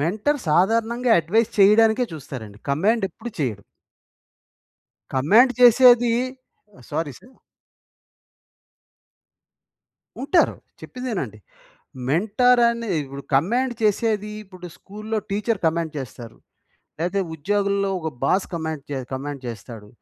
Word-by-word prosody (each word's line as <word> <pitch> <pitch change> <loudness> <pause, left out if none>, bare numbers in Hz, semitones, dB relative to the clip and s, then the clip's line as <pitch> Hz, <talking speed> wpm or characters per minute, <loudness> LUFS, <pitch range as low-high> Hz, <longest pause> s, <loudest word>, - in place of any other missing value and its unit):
Mentor 210 - 0
సాధారణంగా 230 +8 +2
advice 215 +8 +1
చేయడానికే 220 +4 +5
చూస్తారండి. 110 -8 -9
కమాండ్ 200 +9 +1
ఎప్పుడు 225 +7 -9
చేయడు. 110 -7 -2 1.5
కమాండ్ 210 - +4
చేసేది 245 -1 +7 0.8
సారీ 155 -3 -2
సార్. 255 +2 -20 2.9
ఉంటారు, 335 +5 +2 0.2
చెప్పేదినండి. 215 - -5 0.7
మెంటర్ 220 - +3
అనిదిప్పుడు, 160 -13 -4
కమాండ్ 240 - +1
చేసేది 210 0 +1
ఇప్పుడు 185 -2 -11
స్కూల్‌లో 215 +2 -5
టీచర్ 210 +1 -1
కమాండ్ 160 -1 -1
చేస్తారు. 120 -3 -9 0.6
లేతే 180 +4 0
ఉద్యోగుల్లో 200 +4 0
ఒక 160 - -3 0.2
బాస్ 185 +7 +1
కమాండ్ 160 -3 -4
చే 140 - -2
కమాండ్ 140 +1 -5
చేస్తాడు. 110 -1 -9
200 Hz, 95 wpm, -22 LUFS, 145-230 Hz, 2.9 s, చేసేది